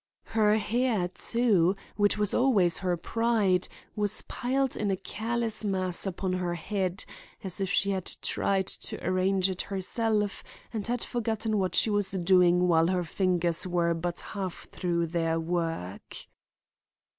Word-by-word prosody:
Her 215 -1 +4
hair, 220 -4 0
too, 200 -4 +2 0.2
which 205 0 +2
was 210 -1 +2
always 205 -10 +3
her 180 -2 0
pride, 210 -2 +1 0.3
was 210 -1 -1
piled 265 +1 -1
in 210 - -1
a 195 - +2
careless 225 +3 -2
mass 185 -2 0
upon 185 0 -2
her 180 -1 -1
head 185 +2 -2 0.4
as 190 0 -4
if 190 - 0
she 200 +1 +2
had 190 -2 -2 0.2
tried 195 -1 0
to - - -3
arrange 185 +1 +2
it 185 - -2
herself 210 +1 -1 0.3
and 215 -2 -3
had 240 0 -1
forgotten 220 -2 -1
what 185 -2 -1
she 220 - +4
was 205 -2 +1
doing 180 -1 +4
while 165 -1 +4
her 180 0 +1
fingers 175 0 0
were 170 -1 +1
but 170 +1 -3
half 190 -4 -6
through 170 -2 0
their 165 0 0
work. 165 - -3
190 Hz, 145 wpm, -28 LUFS, 175-215 Hz, 0.4 s, Her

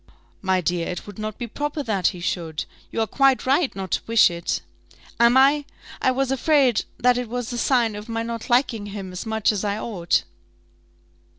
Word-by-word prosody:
"My 190 -1 +1
dear, 175 0 -1
it 180 - -5
would 205 0 -10
not 215 -1 -4
be 240 - -4
proper 295 +5 -3
that 205 -7 +1
he 180 - -3
should; 165 -4 -3 0.3
you 225 - -1
are - - +2
quite 270 +5 +2
right 275 +3 +2
not 190 -2 -5
to - - +1
wish 230 -5 +5
it." 170 0 -2 0.6
"Am 235 +2 +6
I? 280 +2 +5 0.4
I - - +3
was 265 0 0
afraid 270 -3 +3
that 250 0 +3
it 245 -2 -5
was 245 0 -4
a - - -3
sign 235 -5 +2
of 210 +2 -8
my 230 0 -2
not 230 -1 -5
liking 240 -4 +2
him 195 -2 -6
as 180 +5 -6
much 220 -1 +2
as 210 -2 -3
I 205 0 -1
ought." 190 -7 0
225 Hz, 200 wpm, -23 LUFS, 195-255 Hz, 0.6 s, Am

